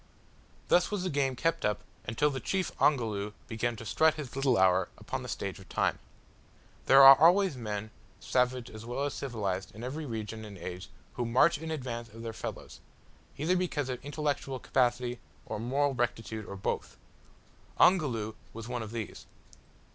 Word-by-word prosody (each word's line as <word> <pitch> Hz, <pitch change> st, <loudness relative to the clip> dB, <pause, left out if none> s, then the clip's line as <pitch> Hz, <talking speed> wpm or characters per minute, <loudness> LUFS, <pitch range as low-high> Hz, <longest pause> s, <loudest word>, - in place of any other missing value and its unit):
Thus 175 Hz, 0 st, +4 dB
was 205 Hz, -3 st, -2 dB
the 185 Hz, -, -1 dB
game 135 Hz, -2 st, +1 dB
kept 165 Hz, +5 st, 0 dB
up 105 Hz, 0 st, 0 dB, 0.2 s
until 145 Hz, +7 st, +1 dB
the 135 Hz, -, -3 dB
chief 190 Hz, +3 st, -1 dB
Ongoloo 110 Hz, -7 st, +2 dB
began 120 Hz, 0 st, -1 dB
to 115 Hz, -, -9 dB
strut 155 Hz, +8 st, +3 dB
his 140 Hz, -5 st, -7 dB
little 135 Hz, -3 st, +2 dB
hour 95 Hz, -1 st, +4 dB
upon -, -, -5 dB
the -, -, -7 dB
stage -, -, -4 dB
of -, -, -15 dB
time. -, -, 0 dB, 0.9 s
There 135 Hz, +1 st, +8 dB
are 135 Hz, 0 st, +12 dB
always 180 Hz, +2 st, +5 dB
men, 110 Hz, -3 st, -4 dB, 0.3 s
savage 125 Hz, -1 st, 0 dB
as 110 Hz, 0 st, -9 dB
well 120 Hz, +4 st, -3 dB
as 145 Hz, -, -2 dB
civilised, 100 Hz, -8 st, -3 dB
in 110 Hz, -, -8 dB
every 145 Hz, +4 st, -4 dB
region 110 Hz, -1 st, -5 dB
and 105 Hz, -2 st, -9 dB
age, 90 Hz, +1 st, -7 dB, 0.2 s
who 120 Hz, -, -2 dB
march 140 Hz, +7 st, +4 dB
in 160 Hz, +1 st, -6 dB
advance 125 Hz, -6 st, -4 dB
of 115 Hz, +2 st, -11 dB
their 115 Hz, -1 st, -4 dB
fellows, -, -, -7 dB, 0.6 s
either 160 Hz, +6 st, +1 dB
because 160 Hz, -7 st, -1 dB
of 125 Hz, -1 st, -4 dB
intellectual 145 Hz, -2 st, -2 dB
capacity 125 Hz, -1 st, 0 dB, 0.3 s
or -, -, -4 dB
moral 135 Hz, +5 st, +1 dB
rectitude 115 Hz, -3 st, -2 dB
or 100 Hz, -, -6 dB
both. 95 Hz, -, -3 dB, 0.8 s
Ongoloo 125 Hz, -, +3 dB, 0.2 s
was 115 Hz, 0 st, -7 dB
one 120 Hz, -1 st, -3 dB
of 110 Hz, -, -6 dB
these. 115 Hz, -3 st, -6 dB
125 Hz, 170 wpm, -30 LUFS, 110-145 Hz, 0.9 s, are